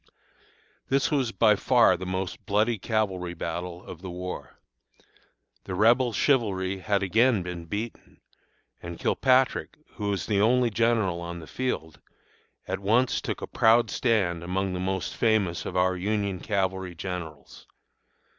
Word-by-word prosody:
"This 135 +2 +2
was 135 -6 +1
by 110 -3 +4
far - - +4
the 95 - -6
most 95 0 -4
bloody 105 +2 +1
cavalry 95 -5 -1
battle 85 +2 -5
of 85 - -10
the 95 - -7
war. 90 +1 -7 1.1
The 95 - -4
Rebel 120 +5 +4
chivalry 100 -7 +1
had 100 +1 0
again 110 +2 +3
been 90 -1 -6
beaten, 105 +7 -6 0.6
and 85 -1 -7
Kilpatrick, 130 0 +2 0.2
who 105 -3 -2
was 100 -2 -1
the 100 -2 +1
only 120 +2 +3
general 110 -6 +1
on 85 0 -6
the 85 - -9
field, 80 -9 -4 0.7
at 95 +1 -2
once 115 +6 +2
took - - -4
a - - -1
proud 115 +1 +3
stand 95 -9 +1
among 95 +2 -1
the 90 - -3
most 95 0 -2
famous 105 -7 +1
of - - -4
our 95 0 +2
Union 100 0 -1
cavalry 95 -3 -2
generals. 85 -5 -7
95 Hz, 145 wpm, -26 LUFS, 90-115 Hz, 1.1 s, by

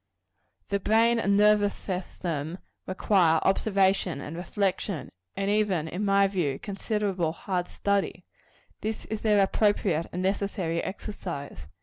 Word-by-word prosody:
The 200 - +1
brain 225 +4 +3
and 200 -2 +2
nervous 210 0 +4
system 175 -4 -4 0.3
require 185 -4 +3
observation 195 -4 +2
and 145 +3 -6
reflection; 190 -1 -2 0.2
and 195 +1 0
even, 200 -7 +1
in 180 +5 -3
my 200 -1 +4
view, 175 -9 0
considerable 195 -4 -2
hard 180 +1 -2
study. 200 -1 -1 0.6
This 220 0 -3
is 220 -1 -4
their 210 -2 +4
appropriate 195 -5 +1
and 180 +1 -3
necessary 190 -3 -1
exercise. 180 -7 -6
195 Hz, 120 wpm, -27 LUFS, 175-205 Hz, 0.6 s, nervous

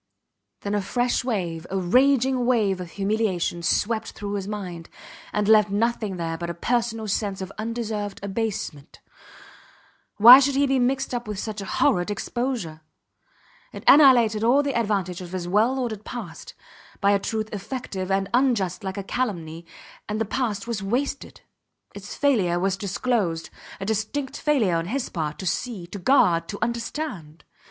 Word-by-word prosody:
Then 200 - -3
a 205 - +1
fresh 245 +6 0
wave, 175 -9 -3
a 195 - -2
raging 255 +5 +3
wave 205 -7 +2
of 175 - -7
humiliation, 195 -3 -1
swept 220 +6 0
through 205 -1 -5
his 200 -1 -3
mind, 180 -5 -6 0.4
and 210 -1 0
left 215 -1 +5
nothing 215 -2 -1
there 165 -1 -3
but 170 -1 -4
a 170 - -4
personal 225 +2 -1
sense 200 -1 -1
of 190 0 -6
undeserved 220 -3 -3
abasement. 200 -8 -4 1.2
Why 240 +5 +11
should 280 0 +1
he 280 +1 +3
be 270 -1 +1
mixed 265 +2 0
up 240 -2 -3
with 210 -2 -4
such 215 +1 -4
a - - -6
horrid 175 0 +1
exposure! 210 -6 -3 0.9
It - - -8
annihilated 240 -7 +6
all 260 +5 +4
the 280 -1 -1
advantages 195 -6 -1
of 175 - -13
his 180 -2 -3
well 220 +8 +2
ordered 225 -5 -3
past, 200 -10 -8 0.4
by 200 0 +3
a 200 - +3
truth 220 +1 -3
effective 200 -2 -5
and 195 0 +1
unjust 230 -9 +1
like 190 0 -4
a 200 - -3
calumny 170 -8 -3 0.4
and 210 +1 -2
the 225 - 0
past 215 -3 -2
was 230 -3 -3
wasted. 245 +9 -3 0.5
Its - - -8
failure 210 -12 +2
was 190 +1 +1
disclosed 195 -3 -1 0.3
a 195 - -4
distinct 220 +6 -2
failure, 230 - +2
on 165 +1 -3
his 255 +5 -2
part, 155 -3 -3
to 190 - -7
see, 200 0 -2
to 200 +4 -8
guard, 180 -7 +3
to 205 - -5
understand. 235 - -4
210 Hz, 160 wpm, -24 LUFS, 185-240 Hz, 1.2 s, Why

